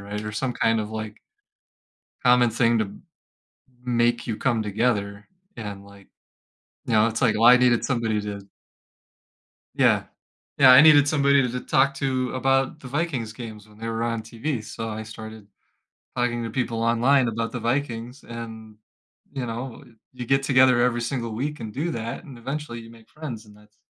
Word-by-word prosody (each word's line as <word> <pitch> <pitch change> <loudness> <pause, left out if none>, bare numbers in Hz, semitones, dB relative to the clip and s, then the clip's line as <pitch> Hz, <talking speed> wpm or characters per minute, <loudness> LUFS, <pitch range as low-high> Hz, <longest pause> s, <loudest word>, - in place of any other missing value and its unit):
right, 105 +1 -6
or 110 - -4
some 125 +4 -2
kind 115 -1 +1
of, 105 0 -5
like 110 -1 -6 1.1
common 125 -1 +5
thing 115 0 +2
to 100 -2 -2 0.9
make 120 -1 +1
you 110 -3 -3
come 120 -4 0
together, 105 -1 -1 0.3
and, 100 -3 -7
like, 100 -1 -16 0.8
you 120 - -2
know, 110 0 +5
it's 115 0 -3
like, 115 - +3
well, 115 +2 +3
I 125 +1 +9
needed 125 -2 +3
somebody 115 -5 0
to 105 -1 -6 1.3
yeah. - - +3 0.5
Yeah, 130 -2 +8
I 125 - +10
needed 145 -2 +7
somebody 140 -2 +3
to 125 - 0
to 125 +1 -4
talk 135 +2 +2
to 130 -2 -1
about 135 +3 +1
the 130 - -9
Vikings' 135 -6 -2
games 110 -3 -9
when 105 0 -19
they 115 +1 -5
were 115 0 -2
on 115 -1 -2
TV, 115 +3 -4
so 115 +1 -6
I 110 0 -5
started 110 -1 -10 0.7
talking 120 -1 -1
to 115 - -4
people 115 -2 -2
online 120 +3 +3
about 115 0 -2
the 125 - -4
Vikings, 120 0 -3
and, 110 -2 -9 0.6
you 130 -3 -3
know, 120 +2 -6 0.3
you 125 -1 -6
get 135 +3 +2
together 130 -2 +5
every 120 -1 +1
single 120 -1 -3
week 145 +6 -3
and 110 -2 -7
do 155 +6 -2
that, 115 +3 -5
and 140 -8 -11
eventually 135 0 -5
you 115 0 -12
make 115 -1 -18
friends, 130 -8 -8
and 105 -1 -17
that's 105 +1 -23
115 Hz, 180 wpm, -24 LUFS, 110-130 Hz, 1.3 s, I